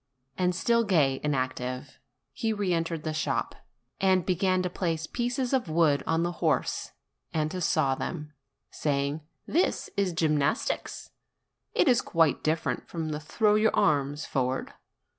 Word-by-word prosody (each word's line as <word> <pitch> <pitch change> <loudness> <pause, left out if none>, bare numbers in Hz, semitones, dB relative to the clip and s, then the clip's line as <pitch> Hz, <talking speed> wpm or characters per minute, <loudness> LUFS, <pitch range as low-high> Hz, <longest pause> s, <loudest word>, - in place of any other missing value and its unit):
And 180 -1 +1
still 235 +5 +2
gay 150 -10 +2
and 150 -1 +1
active, 130 +1 -3 0.3
he 225 - -1
re 200 -4 0
entered 165 -1 -1
the 155 - -2
shop, 155 -3 -1 0.5
and 190 -2 +3
began 185 0 +1
to 180 - -1
place 165 -3 -1
pieces 245 - -2
of 255 -10 +1
wood 155 -3 +3
on 165 +1 +2
the 175 - 0
horse - - 0 0.4
and 155 -1 0
to 185 0 -4
saw 155 -5 +2
them, 150 +2 -5 0.4
saying: 140 +1 -1 0.2
"This 345 +4 0
is 195 -2 +2
gymnastics: 155 - 0 0.6
it - - +4
is 245 -3 +5
quite 165 -3 +2
different 160 +1 -1
from 165 -2 -3
the 150 -1 -3
throw 210 +8 +2
your 215 +1 +3
arms 145 0 +1
forward. 130 -1 -1
160 Hz, 150 wpm, -28 LUFS, 150-190 Hz, 0.6 s, is